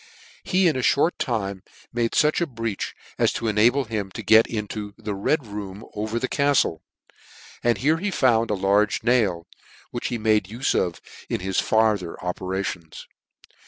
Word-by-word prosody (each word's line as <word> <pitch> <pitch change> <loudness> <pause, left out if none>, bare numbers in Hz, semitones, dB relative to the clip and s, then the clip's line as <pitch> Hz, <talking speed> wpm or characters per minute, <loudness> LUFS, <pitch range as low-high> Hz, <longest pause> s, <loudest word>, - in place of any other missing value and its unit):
He 185 0 +3
in 160 - +2
a - - -1
fhort 145 +6 +2
time 100 -5 -2 0.3
made 115 -1 0
fuch 150 +3 +3
a 170 - +1
breach 115 -6 -4 0.2
as - - +3
to 115 - -3
enable 115 +6 +3
him 105 -4 -3
to 110 - -6
get 110 +3 +6
into 105 -1 -5
the 110 -2 -4
Red 125 +8 0
room 100 0 -7
over 110 +2 -3
the 130 - -1
caftle; 140 - +2 0.8
and 120 -2 +2
here 150 +8 +2
he 200 +5 -2
found 120 - +2
a 105 - +1
large 100 +1 +2
nail, 105 -9 +2 0.5
which 120 - -3
he 120 - -2
made 110 -2 +2
ufe 115 +7 -1
of 85 -2 -1 0.3
in - - -2
his 95 0 0
farther 110 -6 +1
operations. 90 -2 -4
110 Hz, 165 wpm, -24 LUFS, 100-120 Hz, 0.8 s, get